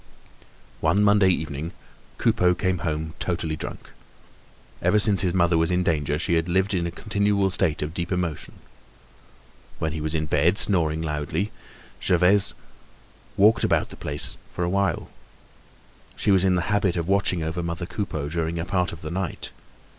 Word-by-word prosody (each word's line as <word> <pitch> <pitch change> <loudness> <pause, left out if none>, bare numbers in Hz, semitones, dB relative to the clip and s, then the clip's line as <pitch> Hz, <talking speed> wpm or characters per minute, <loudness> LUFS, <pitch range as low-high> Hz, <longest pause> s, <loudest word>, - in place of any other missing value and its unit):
One 105 - +2
Monday 100 -2 +5
evening, 80 -2 -2 0.4
Coupeau 90 0 +2
came 95 -2 -1
home 80 -1 -3
totally 85 -3 -2
drunk. - - -8 0.9
Ever 105 - +3
since 100 -3 +4
his 90 -2 +1
mother 85 -2 +3
was 80 - +1
in 90 0 +1
danger, 75 -3 0
he 85 +1 -1
had 85 +1 +1
lived 95 +3 +1
in 85 -2 0
a - - -2
continual 100 +1 0
state 85 -5 +1
of 75 +2 -5
deep 85 0 -4
emotion. 90 -5 -3 1.2
When 80 - -2
he 80 0 -4
was 80 +1 -2
in 80 -1 0
bed, 85 +5 +2
snoring 80 -7 +3
soundly, 75 +6 -2 0.5
Gervaise 90 +3 +4 0.8
walked 105 +3 +5
about - - +1
the - - -8
place 75 0 -2 0.2
for 90 - -1
a 85 - 0
while. 100 0 -1 1.0
She - - +1
was 95 -1 +4
in 95 -1 +3
the 90 - 0
habit 95 -3 +1
of 85 0 -2
watching 95 -3 +1
over 80 +2 -3
mother 85 +1 -4
Coupeau 85 -7 -4
during 85 +1 -2
a 85 - -2
part 90 -1 0
of 80 - -10
the 75 - -5
night. 95 -1 -4
85 Hz, 170 wpm, -24 LUFS, 80-95 Hz, 1.2 s, Monday